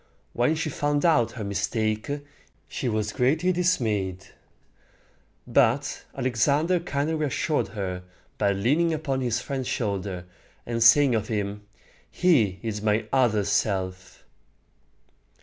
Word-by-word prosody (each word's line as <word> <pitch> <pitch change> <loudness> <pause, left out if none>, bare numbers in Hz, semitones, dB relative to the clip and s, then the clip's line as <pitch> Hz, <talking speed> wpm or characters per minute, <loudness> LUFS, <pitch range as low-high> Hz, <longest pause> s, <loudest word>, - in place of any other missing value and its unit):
When 125 +7 +2
she 155 -1 -2
found 145 +2 0
out 150 -9 +3
her 115 - -6
mistake, 105 +3 -1 0.6
she 125 - -3
was 110 -1 -1
greatly 155 +9 +2
dismayed; 110 - 0 1.2
but - - +2 0.2
Alexander 140 +8 +2
kindly 150 -2 -2
reassured 155 0 0
her 95 -4 -4 0.4
by 100 -1 +3
leaning 145 +12 +1
upon 140 -4 -2
his 120 -1 0
friend's 135 -3 -4
shoulder, 100 -6 -3 0.4
and 115 -1 -3
saying 125 +3 +6
of 110 -2 0
him, 105 -1 -3 0.4
"He 120 - +2
is 105 -2 -3
my 105 +1 +1
other 120 -6 +3
self." 95 -3 -2
115 Hz, 115 wpm, -25 LUFS, 105-145 Hz, 1.2 s, saying